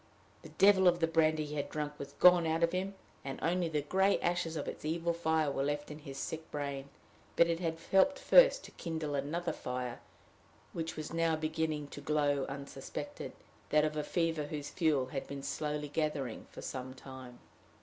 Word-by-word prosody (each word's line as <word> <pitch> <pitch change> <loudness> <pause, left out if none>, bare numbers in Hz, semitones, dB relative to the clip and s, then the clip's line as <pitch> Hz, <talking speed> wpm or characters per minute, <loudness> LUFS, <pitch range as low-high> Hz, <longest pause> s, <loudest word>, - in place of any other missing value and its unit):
The - - -11
devil 190 -1 +5
of 175 -1 +4
the 165 - +4
brandy 155 -1 +2
he 150 - -7
had 145 - -2
drunk 150 -1 -3
was 140 - -7
gone 180 -2 +6
out 160 +1 +1
of 170 - +3
him, 190 +2 -2 0.3
and 135 -1 -5
only 175 0 +1
the 150 -2 -1
gray 190 +6 +3
ashes 170 -2 0
of 150 - -3
its - - -6
evil 165 +2 0
fire 160 -3 +1
were 135 - -1
left 145 +1 -2
in 150 - -8
his 135 -2 -9
sick 160 +3 -5
brain, 140 -1 -4 0.5
but 170 - +6
it 170 0 -1
had 165 -2 -2
helped 275 +9 +5
first - - +6
to - - -11
kindle 160 -3 -4
another 155 +5 -1
fire, 125 -1 -4 0.7
which 165 -1 -3
was 155 +1 -5
now 165 -1 +2
beginning 155 -1 -1
to 145 - -8
glow 145 -2 +1
unsuspected 140 0 -6 0.4
that 150 0 +4
of 155 0 -2
a 150 - -1
fever 165 -1 0
whose 145 -1 -5
fuel 155 -6 +2
had 135 0 -4
been 140 -1 -6
slowly 150 0 -2
gathering 145 -5 -2
for - - -10
some 130 0 -5
time. 130 -2 -10
155 Hz, 190 wpm, -33 LUFS, 145-165 Hz, 0.7 s, gone